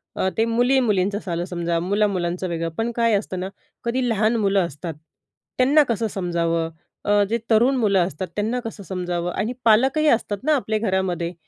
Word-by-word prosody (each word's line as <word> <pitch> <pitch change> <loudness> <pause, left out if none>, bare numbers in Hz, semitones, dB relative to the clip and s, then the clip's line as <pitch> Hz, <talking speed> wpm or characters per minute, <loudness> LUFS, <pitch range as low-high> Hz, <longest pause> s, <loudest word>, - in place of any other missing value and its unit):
अ, 190 - +1
ते 225 - +3
मुली-मुलींचं 230 -5 +1
आलं 170 +1 -1
समजा, 170 -2 -2
मुला-मुलांचं 185 -1 0
वेगळं. 165 0 -2
पण 230 +1 -1
काय 230 -1 +2
असतं 190 -2 -4
ना, 185 +1 -3 0.3
कधी 245 +2 0
लहान 220 +1 +2
मुलं 195 -4 +2
असतात 160 +2 -7 0.6
त्यांना 280 +4 +5
कसं 230 -1 0
समजावं? 170 -4 -1 0.4
अ, 205 0 +4
जे 230 - +1
तरुण 240 +5 +4
मुलं 200 -6 +3
असतात 185 +2 -5
त्यांना 220 +4 -1
कसं 220 -2 -7
समजावं? 180 -1 -3
आणि 230 +4 -2
पालकही 265 +8 +4
असतात 215 -4 +1
ना 305 +2 +3
आपल्या 220 -5 -1
घरामध्ये. 190 -4 -1
205 Hz, 165 wpm, -22 LUFS, 180-230 Hz, 0.6 s, त्यांना